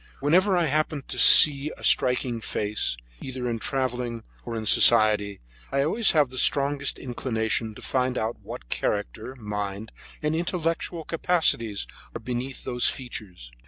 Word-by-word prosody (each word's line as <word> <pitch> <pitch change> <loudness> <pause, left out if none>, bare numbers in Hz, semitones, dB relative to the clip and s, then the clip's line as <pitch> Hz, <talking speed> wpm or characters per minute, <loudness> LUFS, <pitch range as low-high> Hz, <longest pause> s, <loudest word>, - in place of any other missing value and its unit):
Whenever 185 +7 +2
I 175 - +1
happen 155 -1 -2
to 125 - -4
see 145 +4 +8
a - - -15
striking 125 -1 +2
new - - -10
face, 105 - -2 0.2
either 130 -1 -6
in 115 -1 -3
travelling 125 -1 -4 0.2
or 120 - -7
in 110 -1 -5
society, 105 -2 +4 0.3
I 140 0 0
always 215 +9 +3
have 150 -5 +2
the 130 - -3
strongest 140 +1 +1
inclination 110 -3 -3
to - - -13
find 130 -1 -2
out 110 +2 -4
what - - -10
character, 130 - -4
mind, 105 -2 -6 0.3
and 150 +1 -1
intellectual 165 -1 -3
capacities 155 - 0 0.3
are - - -5
hidden - - -22 0.2
beneath 135 +1 -7
those 125 -1 +1
features. 95 - -9
125 Hz, 155 wpm, -24 LUFS, 110-145 Hz, 0.3 s, see